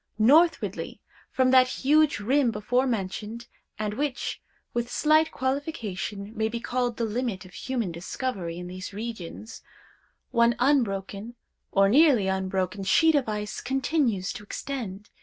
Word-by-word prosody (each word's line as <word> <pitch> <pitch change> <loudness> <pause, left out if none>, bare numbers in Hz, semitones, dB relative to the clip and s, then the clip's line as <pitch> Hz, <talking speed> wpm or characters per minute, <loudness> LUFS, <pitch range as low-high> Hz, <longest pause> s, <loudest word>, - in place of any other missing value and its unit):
Northwardly 305 +10 +3 0.3
from 260 -1 +2
that 255 -1 +7
huge 295 +2 +3
rim 255 +5 +2
before 240 +5 0
mentioned, 215 +1 -3 0.3
and 210 -1 -2
which, 275 +1 -3 0.3
with 240 0 -1
slight 310 +3 +3
qualification, 225 - -3
may 220 0 0
be 235 +1 -3
called 245 -1 -1
the 230 - 0
limit 220 -4 -3
of 185 - -15
human 240 -8 -3
discovery 175 0 -4
in 180 - -6
these 185 +2 -7
regions, 220 0 -7 0.7
one 235 0 +4
unbroken, 230 -4 0 0.4
or 195 0 +4
nearly 265 -2 +5
unbroken, 190 0 -1
sheet 320 - +4
of 280 -6 +1
ice 210 0 -4
continues 260 - 0
to - - -8
extend. 210 -3 -6
230 Hz, 135 wpm, -26 LUFS, 200-260 Hz, 0.7 s, that